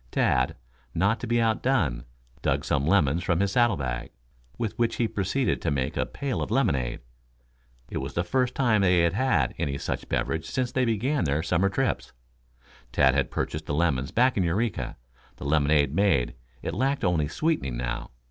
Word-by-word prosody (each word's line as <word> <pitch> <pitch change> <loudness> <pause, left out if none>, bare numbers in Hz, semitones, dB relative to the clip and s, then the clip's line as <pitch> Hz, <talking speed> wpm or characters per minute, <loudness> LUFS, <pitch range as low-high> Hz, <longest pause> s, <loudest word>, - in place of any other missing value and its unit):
Tad, - - +1 0.4
not 105 +4 +2
to - - -5
be 120 +1 +2
out 115 -1 +1
done, 80 - +1 0.4
dug - - 0
some 70 +1 0
lemons 85 -3 +3
from 85 -2 +1
his 100 0 +1
saddle 120 -3 +3
bag, 65 -3 -3 0.5
with 110 -3 -2
which 115 -1 +1
he 115 - +1
proceeded 110 +6 -1
to - - 0
make 70 -2 -1
a - - 0
pail 140 -3 -3
of - - -3
lemonade. 75 - 0 0.9
It - - -2
was - - -6
the 85 - +1
first 125 +6 0
time 120 -6 +3
they 90 -2 +4
had 85 0 +2
had 100 - +1
any 70 -1 -1
such - - -4
beverage 80 0 -1
since 125 +8 -2
they 130 -1 +1
began 120 - 0
their 75 +2 0
summer 90 +3 +2
trips. 130 +7 -1 0.8
Tad 65 -1 +4
had 70 -3 +1
purchased 75 0 -3
the 75 - -1
lemons 70 -5 +1
back 125 +1 +2
in 95 - +3
Eureka. 100 +5 -1 0.4
The - - -9
lemonade 75 -1 +3
made, 75 -11 +2 0.3
it 80 - -3
lacked 135 +8 0
only 85 -4 +2
sweetening 80 - -1
now. - - -3
90 Hz, 185 wpm, -26 LUFS, 70-120 Hz, 0.9 s, they